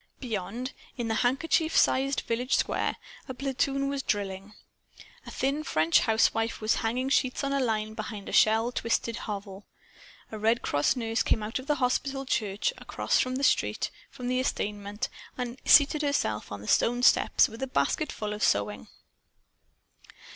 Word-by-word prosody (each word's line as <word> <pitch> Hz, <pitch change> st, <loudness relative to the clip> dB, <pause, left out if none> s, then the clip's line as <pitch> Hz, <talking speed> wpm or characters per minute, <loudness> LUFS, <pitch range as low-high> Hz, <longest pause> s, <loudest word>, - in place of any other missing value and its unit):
Beyond, 235 Hz, +2 st, -4 dB, 0.2 s
in 235 Hz, -2 st, -2 dB
the -, -, +1 dB
handkerchief 315 Hz, +6 st, +1 dB
sized 270 Hz, +1 st, +3 dB
village 245 Hz, +3 st, 0 dB
square, -, -, 0 dB, 0.3 s
a 260 Hz, -, -6 dB
platoon 275 Hz, +1 st, -1 dB
was 280 Hz, 0 st, -2 dB
drilling. 200 Hz, -2 st, -3 dB, 0.7 s
A -, -, -6 dB
thin 275 Hz, +3 st, -1 dB
French 160 Hz, -, +3 dB
housewife 225 Hz, 0 st, +1 dB
was 215 Hz, 0 st, +1 dB
hanging 245 Hz, +4 st, -1 dB
sheets 260 Hz, 0 st, +1 dB
on 275 Hz, 0 st, -1 dB
a 275 Hz, -, +1 dB
line 215 Hz, -4 st, -1 dB
behind 215 Hz, -2 st, -6 dB
a -, -, -5 dB
shell 225 Hz, +2 st, +4 dB
twisted 230 Hz, -1 st, -1 dB
hovel. 200 Hz, -2 st, -7 dB, 0.6 s
A 215 Hz, -, -6 dB
Red 225 Hz, +3 st, +2 dB
Cross 145 Hz, -, +1 dB
nurse 225 Hz, -3 st, -1 dB
came 215 Hz, -, +1 dB
out 220 Hz, +4 st, -3 dB
of 260 Hz, -, -10 dB
the 295 Hz, -, +2 dB
hospital 270 Hz, +1 st, -1 dB
church 210 Hz, -5 st, -1 dB
across -, -, 0 dB
the 255 Hz, +2 st, -3 dB
street -, -, +1 dB, 0.2 s
from 250 Hz, -2 st, -7 dB
the 255 Hz, +1 st, +1 dB
estaminet 205 Hz, -3 st, -2 dB, 0.3 s
and 250 Hz, 0 st, -5 dB
seated 295 Hz, +1 st, +6 dB
herself 280 Hz, -, -1 dB
on 100 Hz, -, -6 dB
the 105 Hz, -, -10 dB
stone 245 Hz, +1 st, +2 dB
steps -, -, +5 dB
with 225 Hz, +2 st, -11 dB
a 265 Hz, -, -1 dB
basketful 220 Hz, -5 st, -1 dB
of 210 Hz, -, -7 dB
sewing. 100 Hz, -6 st, 0 dB
230 Hz, 160 wpm, -28 LUFS, 210-265 Hz, 0.7 s, seated